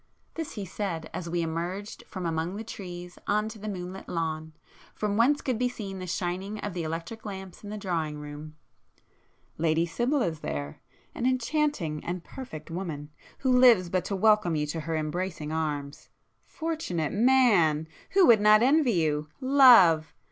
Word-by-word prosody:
this 325 -2 -5
he 205 -3 -5
said 175 -3 -4
as 170 -2 -5
we 170 0 0
emerged 175 +6 -4
from 185 -2 -6
among 165 +2 -2
the 220 - -5
trees 180 -5 -8
on 210 +1 +1
to 220 0 -8
the 215 +1 -5
moonlit 185 -1 -6
lawn, 160 -2 -3 0.4
from 210 -1 -1
whence 265 +7 +3
could 250 -4 -1
be 250 0 +2
seen 195 -6 -7
the 185 - -6
shining 185 +3 -3
of 205 - -4
the 175 - -3
electric 165 +8 -5
lamps 190 -2 -8
in 205 - -7
the 215 - -5
drawing 165 -7 -2
room—"Lady 150 +2 -6
Sibyl 240 - 0
is 160 -6 -2
there,—an 70 - -5
enchanting 255 - 0
and 175 0 -4
perfect 165 - -9
woman, 160 -5 -5 0.3
who 260 -2 +2
lives 235 -8 +6
but 185 0 0
to 200 - -2
welcome 210 -4 +3
you 150 -1 0
to 150 +2 -4
her 160 +1 -3
embracing 155 0 -3
arms! 150 -3 -3 0.4
Fortunate 305 - -3
man!—who 210 - +3
would 225 -6 +6
not 215 +1 +6
envy 275 -2 +4
you! 155 -3 0
Love! 240 - +6
180 Hz, 160 wpm, -28 LUFS, 160-220 Hz, 0.4 s, lives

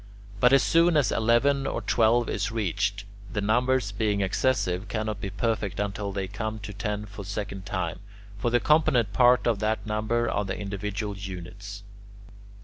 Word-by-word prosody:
But 125 +4 +5
as 135 -1 +6
soon 165 0 +4
as 145 - +3
eleven 135 +5 +2
or - - -2
twelve 115 +1 +3
is 110 +1 -1
reached, 100 -1 -1 0.3
the 105 - -2
numbers, 120 +2 +1
being 105 0 0
excessive, 95 -2 0
cannot 110 -2 -3
be 100 - -3
perfect 100 -1 -2
until 100 0 -2
they 95 -1 -3
come 110 +3 -4
to 100 0 -7
ten 105 0 -3
for 105 +1 -9
the 95 - -9
second 100 -2 -5
time; 90 -4 -3 0.4
for 120 - +1
the 120 +1 +3
component 125 -9 +3
parts 125 0 +5
of 115 -4 +2
that 110 +1 -1
number 110 +2 0
are 105 - 0
the 95 -1 -4
individual 100 +1 -4
units. 100 +1 -8
105 Hz, 170 wpm, -26 LUFS, 100-120 Hz, 0.4 s, as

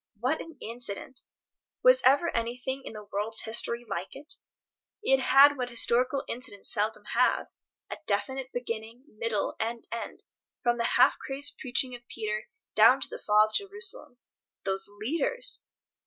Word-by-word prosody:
What 255 +7 0
an 330 - -11
incident! 235 +2 -3 0.6
Was - - +7
ever 285 +6 +4
anything 245 +3 -2
in - - -7
the 210 -1 -8
world's 210 +2 +2
history 235 +1 0
like 175 +3 -5
it? 295 +7 -6 0.7
It 270 -8 +4
had 275 +2 +6
what 250 -1 -3
historical 250 +3 +2
incidents 230 -5 -4
seldom 215 +2 -1
have, - - +2 0.4
a - - -4
definite 255 +6 -1
beginning, 230 0 -5 0.2
middle 220 -3 -1
and 230 +1 -3
end, 230 - -6 0.4
from 240 -1 +1
the 235 - +1
half - - +5
crazed 275 +1 -3
preaching 255 0 0
of 245 - -8
Peter 215 -1 -4 0.2
down - - +6
to - - -2
the 485 - -7
Fall 210 0 +4
of - - -19
Jerusalem. 400 - -1 0.5
Those 195 0 +2
leaders! 325 - -2
245 Hz, 150 wpm, -28 LUFS, 220-270 Hz, 0.7 s, Was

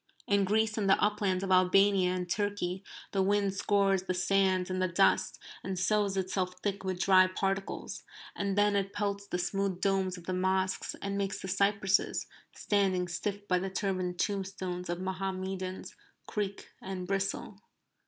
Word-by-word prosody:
In 200 -1 +2
Greece 220 +2 +1
and 200 -2 +1
the 195 - +5
uplands 205 -3 +1
of 190 - -2
Albania 185 0 +4
and 180 -1 -3
Turkey, 200 -1 -2 0.3
the 195 - +1
wind 200 0 +2
scours 195 -1 +2
the 185 -1 -3
sand 185 0 +2
and 185 0 -1
the 185 - +2
dust, 180 +3 +2 0.3
and 190 0 -3
sows 200 +1 +1
itself 185 -1 -1
thick 200 -1 -2
with 185 -1 -3
dry 185 -1 +6
particles. 195 +1 -3 0.3
And 200 -1 -2
then 205 0 +4
it 195 0 -1
pelts 200 -1 -2
the 180 - -2
smooth 190 +1 -1
domes 190 -1 +1
of 175 - -11
the 185 - -3
mosques, 190 +1 0
and 200 0 -2
makes 200 0 -2
the - - -6
cypresses, 200 0 +1 0.3
standing 190 -3 +1
stiff 205 +3 -4
by 180 -1 +2
the 190 +1 -3
turbaned 185 -2 -2
tombstones 190 -3 -3
of 175 0 -2
Mohammedans, 190 0 -4 0.3
creak 200 -2 -4
and 185 -1 -5
bristle. 195 +1 -2
195 Hz, 165 wpm, -31 LUFS, 185-200 Hz, 0.3 s, dry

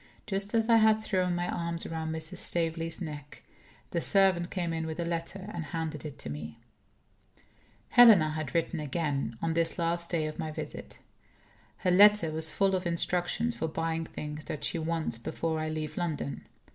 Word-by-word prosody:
Just 200 +2 -2
as 225 -1 +2
I 230 -1 +6
had 220 0 +4
thrown 185 -4 0
my 175 0 -1
arms 170 -1 -3
round 160 -1 -3
Mrs. 160 -1 -4
Staveley's 165 0 -1
neck, 145 -3 -8 0.5
the 170 - 0
servant 190 -3 +3
came 175 -3 -2
in 160 0 -2
with 160 +1 -5
a 170 - -1
letter, 170 +3 -4
and 170 -2 -4
handed 160 -1 -4
it 145 -2 -7
to - - -7
me. 75 +1 -7 1.3
Helena 210 -11 +8
had 155 -2 -4
written 165 0 0
again, 140 -5 -2
on 165 0 +1
this 165 +2 +1
last 170 0 -1
day 165 -3 0
of 155 0 -5
my 155 - -3
visit. - - -7 0.8
Her 185 - +1
letter 205 -3 +6
was 160 0 0
full 195 +4 +1
of 185 -1 0
instructions 175 +7 0
for 160 - -2
buying 165 0 -2
things 150 0 -6
that 150 - -5
she 170 - -1
wants, 160 -6 -2
before 160 +6 -2
I 155 0 -2
leave 155 -1 -4
London. 160 -5 -3
165 Hz, 180 wpm, -30 LUFS, 155-180 Hz, 1.3 s, Helena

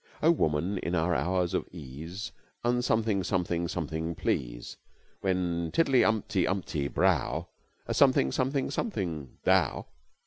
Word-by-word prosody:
"Oh, 165 - +7
woman 90 - +1
in 90 - -2
our 85 +1 +2
hours 90 +5 0
of - - -1
ease, 80 +5 -7 0.3
Un 120 +1 +2
something, 110 -5 +1
something, 85 -2 0
something, 80 -1 -3
please. - - -2 0.4
When 90 -3 0
tiddly 135 -6 +4
umpty 105 -4 +1
umpty 85 -7 -1
brow, 80 +4 +1 0.4
A - - -2
something, 65 - +4
something, 130 - 0
something, 85 - -3
thou!" - - +2
90 Hz, 130 wpm, -29 LUFS, 80-100 Hz, 0.4 s, Oh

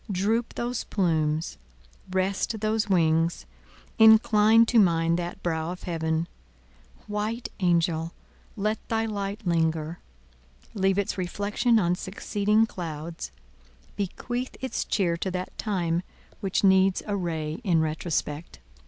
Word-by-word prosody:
droop 215 +5 0
those 240 0 -2
plumes, 160 -5 0 0.5
rest 190 +4 -1
those 215 0 0
wings; 165 -2 +2 0.5
incline 220 0 +7
to 230 0 +4
mine 165 -4 +3
that 175 0 -5
brow 160 -1 -1
of 180 - -8
Heaven! 160 -1 -1 0.8
White 215 +3 -3
Angel! 170 -2 +1 0.5
let 215 +2 0
thy 225 0 +1
light 205 0 -4
linger; 165 -1 0 0.7
leave 195 -1 +1
its 200 -1 -1
reflection 205 +6 +1
on 175 -4 +2
succeeding 205 +4 +1
clouds; 165 -5 -6 0.6
bequeath 245 +6 -4
its 260 - -3
cheer 180 -5 +1
to 190 - -2
that 185 0 -5
time 175 -5 0 0.4
which 195 -2 -1
needs 190 -1 +4
a 205 - -1
ray 160 -2 -3
in 175 -6 +3
retrospect! 155 - -2
185 Hz, 120 wpm, -26 LUFS, 165-210 Hz, 0.8 s, incline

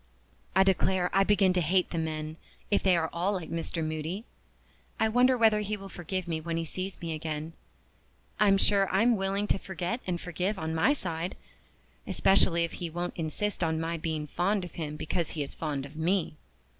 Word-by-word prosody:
I 190 - +7
declare 190 -1 +2
I 195 - +5
begin 195 -2 +4
to 180 - +2
hate 180 +3 +2
the 170 - -1
men, 155 0 -3 0.3
if 205 - +4
they 185 -2 +4
are 160 -1 0
all 180 +4 +1
like 180 -5 -4
Mr. 165 0 -2
Moody. 160 +7 -3 0.7
I 220 - +4
wonder 250 +3 +4
whether 220 -2 +5
he 210 0 -2
will 195 0 -9
forgive 180 +1 -4
me 160 -2 -2
when 165 +1 -2
he 165 - -1
sees 185 +4 -5
me 165 -1 -3
again? 155 0 -4 0.9
I'm 200 -2 +5
sure 195 -1 +3
I'm 225 +5 +4
willing 195 +1 0
to - - +2
forget 190 +5 -3
and 175 -2 -1
forgive 180 +4 -2
on 160 -2 -3
my 165 - +4
side 175 - -3 0.7
especially 175 -3 +3
if 170 - -2
he 175 - -5
won't 175 +2 -3
insist 175 +5 -2
on 160 -1 +1
my 165 +1 -1
being 160 -2 -2
fond 180 +5 0
of 175 - -9
him 150 -3 -5
because 160 +2 -2
he 150 - +1
is 140 - -8
fond 145 -4 -3
of 140 +2 -12
me. 170 +1 0
175 Hz, 195 wpm, -29 LUFS, 160-195 Hz, 0.9 s, I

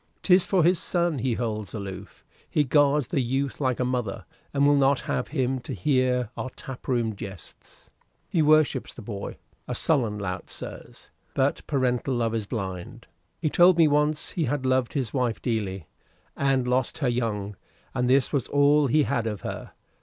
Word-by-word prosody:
'Tis 180 -1 +5
for 185 -4 +3
his 175 +1 +4
son 170 -5 0
he 125 -1 0
holds 110 -3 -3
aloof. 100 -2 -8 0.2
He 150 - +2
guards 145 0 +3
the 135 - +1
youth 135 +3 -2
like 130 -3 0
a 125 - +1
mother, 125 -5 -2 0.3
and 140 0 +2
will 145 0 +5
not 140 -1 +3
have - - -2
him 130 -3 -1
to - - -6
hear 130 -5 +1
our 130 - -4
tap 130 -1 -9
room 115 -4 0
jests. 95 -3 -11 0.4
He 170 - +1
worships 155 0 +3
the 120 - -9
boy 100 -2 -6 0.3
a - - -3
sullen 120 -9 +1
lout, 95 -3 -5
sirs; - - -9 0.2
but - - +2
paternal 130 -2 0
love 115 -2 0
is 110 -3 -2
blind. 95 -6 -5 0.3
He 155 -3 -1
told 175 0 +6
me 165 -2 +6
once 150 +1 +1
he 165 - -1
had 135 0 -2
loved 130 -2 +1
his 130 -7 -2
wife 125 -4 0
dearly, 100 -7 -2 0.5
and 135 -2 +1
lost 125 0 0
her 140 - 0
young, 105 -4 -2 0.4
and 125 0 0
this 135 +1 +3
was 140 -5 0
all 145 0 +4
he 150 +4 +3
had 120 -5 -1
of 105 -2 -4
her. - - -6
130 Hz, 180 wpm, -26 LUFS, 115-145 Hz, 0.5 s, told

